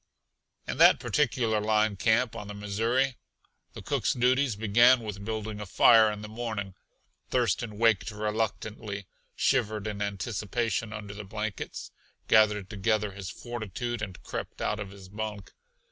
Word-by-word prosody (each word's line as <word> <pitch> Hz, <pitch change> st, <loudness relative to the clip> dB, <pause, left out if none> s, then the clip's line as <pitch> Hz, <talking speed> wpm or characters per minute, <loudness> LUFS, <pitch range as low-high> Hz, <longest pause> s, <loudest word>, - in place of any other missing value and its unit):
In -, -, -3 dB
that -, -, +7 dB
particular 120 Hz, -7 st, +1 dB
line 110 Hz, 0 st, +2 dB
camp 115 Hz, +3 st, +2 dB
on 105 Hz, -, -6 dB
the 105 Hz, -, -7 dB
Missouri 115 Hz, +6 st, 0 dB, 0.6 s
the -, -, -9 dB
cook's -, -, 0 dB
duties 125 Hz, 0 st, +2 dB
began 120 Hz, +4 st, +5 dB
with 105 Hz, -3 st, -6 dB
building 110 Hz, -1 st, -4 dB
a 105 Hz, -, -6 dB
fire 110 Hz, +3 st, +6 dB
in 105 Hz, 0 st, -7 dB
the -, -, -6 dB
morning. 110 Hz, -3 st, -4 dB, 0.6 s
Thurston 115 Hz, -3 st, 0 dB
waked 110 Hz, -3 st, +3 dB
reluctantly, 105 Hz, -1 st, -3 dB, 0.3 s
shivered 110 Hz, -6 st, +1 dB
in 105 Hz, -1 st, -4 dB
anticipation 105 Hz, +2 st, -2 dB
under 105 Hz, -2 st, -7 dB
the 105 Hz, 0 st, -7 dB
blankets, 105 Hz, 0 st, -5 dB, 0.4 s
gathered 105 Hz, -3 st, +4 dB
together 105 Hz, 0 st, 0 dB
his 95 Hz, -2 st, -7 dB
fortitude 120 Hz, 0 st, -5 dB
and 95 Hz, -4 st, -6 dB
crept -, -, -6 dB
out 105 Hz, -, -1 dB
of 105 Hz, -2 st, -5 dB
his 95 Hz, -1 st, -12 dB
bunk. 105 Hz, -1 st, -6 dB
110 Hz, 145 wpm, -28 LUFS, 100-115 Hz, 0.6 s, that